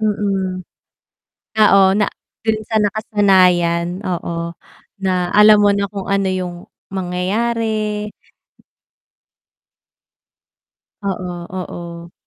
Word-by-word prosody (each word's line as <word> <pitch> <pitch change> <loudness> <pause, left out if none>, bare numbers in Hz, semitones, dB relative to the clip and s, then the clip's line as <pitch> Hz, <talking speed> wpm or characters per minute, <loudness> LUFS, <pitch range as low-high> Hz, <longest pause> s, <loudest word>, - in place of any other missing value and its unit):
Mm. 195 -4 -1 0.9
Oo 205 -2 +6
na 205 - +2 0.4
dun 220 -1 +2
sa 220 - -5
nakasanayan 185 -5 +2
oo 170 -2 -3 0.5
na 185 -1 +1
alam 210 0 +7
mo 205 - +5
na 200 -1 -1
kung 200 -2 -6
ano 195 -1 +1
yung 180 -1 -3 0.4
mangyayari. 210 +3 -1 3.0
Oo, 180 -2 -3 0.2
oo. 170 -2 -7
195 Hz, 85 wpm, -18 LUFS, 180-210 Hz, 3.0 s, alam